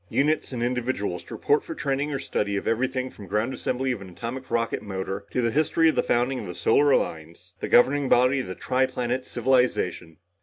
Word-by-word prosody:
Units 150 +2 +1
and 120 -2 -3
individuals 120 -8 -2
to - - -8
report 145 +1 +2
for 165 - -7
training 140 +1 -1
or 140 - -1
study 100 -6 -2
in - - -4
everything 130 +3 0
from 100 - -12
ground 110 +6 -1
assembly 130 +1 -1
of 120 - -4
an 95 - -9
atomic 120 +9 -6
rocket 115 -1 0
motor, 95 0 -5
to 125 - -1
the 115 - +1
history 160 +4 +3
of - - 0
the - - +3
founding 125 +2 0
of 105 - -6
the 90 - -6
Solar 145 +6 +3
Alliance, 85 - -1
the - - -4
governing 135 +2 +4
body 125 +3 +4
of 130 - -4
the 95 - -5
tri 130 +5 +1
planet 125 0 -2
civilization. 125 -9 0
125 Hz, 215 wpm, -25 LUFS, 105-130 Hz, -, governing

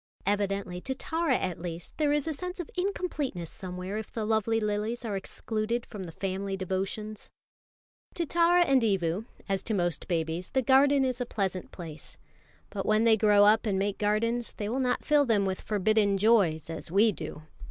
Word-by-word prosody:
Evidently 200 -3 -1
to 265 +5 -3
Tara 320 -1 0
at 180 -3 -3
least 170 -1 -6
there 300 -2 +2
is 295 +1 +1
a 320 - 0
sense 360 +5 -6
of 350 - -6
incompleteness 325 - -2
somewhere 185 +2 -5
if 220 - -8
the 220 -2 -3
lovely 220 +1 +1
lilies 215 +3 -2
are 210 -3 -2
excluded 220 +4 -2
from 200 -4 -7
the 165 - -8
family 195 +2 -3
devotions. 195 +3 -4 0.9
To 340 - -1
Tara 345 +2 +4
and 270 -4 +4
to 225 - +2
Evu, 190 0 0 0.2
as 195 -1 0
to 220 - 0
most 175 -4 -1
babies, 165 0 -2
the 265 0 +1
garden 275 +1 +5
is 255 -1 -2
a - - 0
pleasant 190 -4 -3
place. 160 -4 -9 0.5
But 195 -2 -4
when 215 +1 +3
they 230 -1 +6
grow 205 -1 +5
up 220 +2 +4
and 195 -2 +1
make 200 +1 -1
gardens, 230 +3 0
they 205 - -3
will 245 +5 -1
not 250 -1 0
fill 295 -1 +4
them 220 -6 +2
with 190 -1 -2
forbidden 210 -1 +2
joys 190 -7 +3
as 165 - -7
we 205 +5 +4
do. 155 -3 -7
210 Hz, 190 wpm, -28 LUFS, 190-245 Hz, 0.9 s, they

